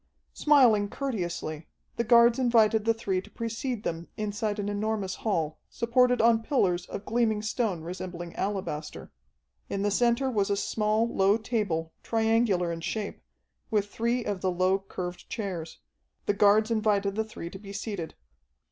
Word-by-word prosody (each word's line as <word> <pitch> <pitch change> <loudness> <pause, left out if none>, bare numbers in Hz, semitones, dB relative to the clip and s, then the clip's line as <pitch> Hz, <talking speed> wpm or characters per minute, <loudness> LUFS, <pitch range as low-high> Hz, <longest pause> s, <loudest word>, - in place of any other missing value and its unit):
Smiling 240 -9 +4
courteously, 175 - -4 0.3
the 235 - 0
guards 235 +1 +6
invited 225 -3 +4
the 230 - +4
three 195 -5 -1
to 210 - -16
precede 230 +2 -4
them 165 -2 -3
inside 210 0 -2
an 205 -1 -2
enormous 205 -2 -1
hall, 165 -8 -1
supported 245 +1 +2
on 230 0 +4
pillars 185 - +1
of 200 - -7
gleaming 220 -2 +1
stone 215 -5 -1
resembling 175 0 -6
alabaster. 190 -6 -4 0.6
In 200 0 -2
the 205 - +1
center 240 +5 +2
was 205 -4 +1
a 200 - +1
small, 215 +2 +1
low 200 -2 +3
table, 200 -9 -2
triangular 220 -6 +1
in 165 0 -5
shape, 205 +4 -4 0.5
with 205 -3 0
three 235 +1 0
of 200 -3 -2
the 190 - +1
low, 185 +2 +2
curved 180 -2 -7
chairs. 180 -7 -4 0.5
The 205 - +2
guards 210 +2 +4
invited 210 -3 +1
the 220 +2 0
three 195 -6 -8
to 190 - -9
be 200 -1 -10
seated. 200 -4 -5
210 Hz, 155 wpm, -28 LUFS, 190-230 Hz, 0.6 s, guards